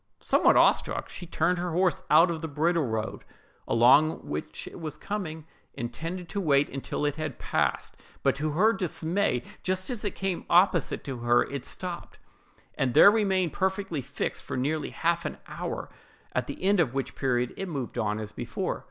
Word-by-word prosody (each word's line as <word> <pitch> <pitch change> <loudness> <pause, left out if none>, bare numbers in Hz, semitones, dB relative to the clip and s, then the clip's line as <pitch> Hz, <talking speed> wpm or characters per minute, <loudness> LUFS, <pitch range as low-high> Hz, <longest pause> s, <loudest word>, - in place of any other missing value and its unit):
Somewhat - - +4
awestruck, - - +3
she 175 - -9
turned 180 +1 +1
her 175 -1 -2
horse 180 0 +2
out 165 +3 +6
of 160 -2 -4
the 160 - -3
bridle 160 0 +1
road, 110 -1 -3 0.4
along 135 +7 +4
which 75 +1 -5
it - - -9
was 155 -2 -5
coming, 160 -7 -5 0.3
intending 165 +10 -5
to 200 +4 -3
wait 140 -4 +1
till - - -2
it 145 0 -1
had 155 -5 -4
passed; - - -1 0.3
but, - - +4
to 150 +1 -1
her 215 +8 +4
dismay, 175 - 0 0.2
just 185 +3 -1
as 235 -3 -4
it 205 - -2
came 190 -2 -3
opposite 175 -2 +3
to 130 -3 -5
her, 120 0 +3
it 140 -2 -6
stopped, 180 -2 -5 0.6
and 125 -3 -1
there 200 - +9
remained 190 -6 +1
perfectly 190 -5 -1
fixed 140 +3 -3
for - - -5
nearly 150 +4 -1
half 170 0 0
an 150 - -4
hour, - - -5 0.5
at - - -1
the - - -7
end 200 +1 +3
of 135 -7 +1
which 135 - -2
period 125 -2 0
it 195 - -4
moved 140 -8 -4
on 105 -1 0
as 105 -1 -6
before. - - -3
160 Hz, 180 wpm, -27 LUFS, 135-185 Hz, 0.6 s, there